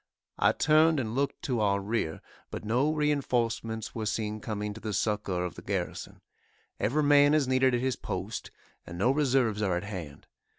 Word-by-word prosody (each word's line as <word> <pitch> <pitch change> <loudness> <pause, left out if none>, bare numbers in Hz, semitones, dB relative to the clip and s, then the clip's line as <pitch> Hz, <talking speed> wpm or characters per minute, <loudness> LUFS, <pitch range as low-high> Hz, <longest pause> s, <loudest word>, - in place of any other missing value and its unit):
I - - +5
turned 155 0 +4
and 110 -3 -3
looked 140 +2 -1
to 125 -4 -1
our 100 -2 +2
rear, 100 -5 -2 0.3
but - - -6
no 125 +8 +2
reinforcements 120 -7 -1
were 110 -2 -3
seen 105 0 -2
coming 105 -1 -4
to 110 - -11
the 110 -2 -4
succor 100 -4 -1
of 90 - -5
the - - -10
garrison. - - -4 0.6
Every 150 +7 +1
man 145 0 +6
is 145 -4 +2
needed 130 -1 +3
at 120 - -1
his 130 -2 -1
post, - - -5 0.4
and 85 - -7
no 120 +8 +3
reserves 130 -7 +1
are 95 -4 +1
at 90 - -4
hand. 90 -8 -7
115 Hz, 180 wpm, -29 LUFS, 105-135 Hz, 0.6 s, man